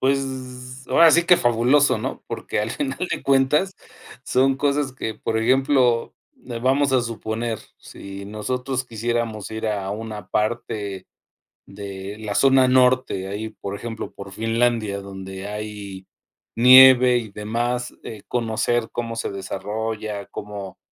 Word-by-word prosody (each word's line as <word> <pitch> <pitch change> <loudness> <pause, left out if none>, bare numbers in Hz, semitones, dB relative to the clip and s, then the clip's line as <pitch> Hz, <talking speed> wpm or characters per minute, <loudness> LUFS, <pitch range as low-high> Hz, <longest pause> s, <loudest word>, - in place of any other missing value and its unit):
pues, 130 -1 -3
ahora 165 -1 +6
sí 170 0 +4
que 180 0 +6
fabuloso, 125 0 +3
¿no? 110 - -5
Porque - - -4
al 105 +2 -1
final 135 -1 -3
de - - -3
cuentas 140 +7 +3 0.5
son 135 +1 +2
cosas 140 -1 0
que, 110 -4 -4
por 110 +1 -2
ejemplo, 130 0 +2 0.4
eh, 120 -1 -4
vamos 135 +3 +2
a 130 - +4
suponer, 115 0 -4 0.2
si 100 0 -10
nosotros 125 +5 -3
quisiéramos 115 -2 -3
ir 110 0 -3
a 100 -2 -2
una 105 -2 -7
parte 105 -3 -2 0.6
de 100 0 -8
la 105 -2 -4
zona 135 -1 +5
norte, 125 -6 +3
ahí, 105 +3 -4
por 100 -2 -7
ejemplo, 115 +1 -6
por 100 0 -10
Finlandia, 115 -1 0
donde 95 0 -8
hay 105 -2 -7 0.5
nieve 125 0 +8
y 110 -3 -4
demás, 120 +4 -2
eh, 110 -3 -8
conocer 120 0 0
cómo 115 -1 -4
se 115 - -3
desarrolla, 105 +1 -4
como 100 -2 -8
115 Hz, 135 wpm, -22 LUFS, 105-130 Hz, 0.6 s, nieve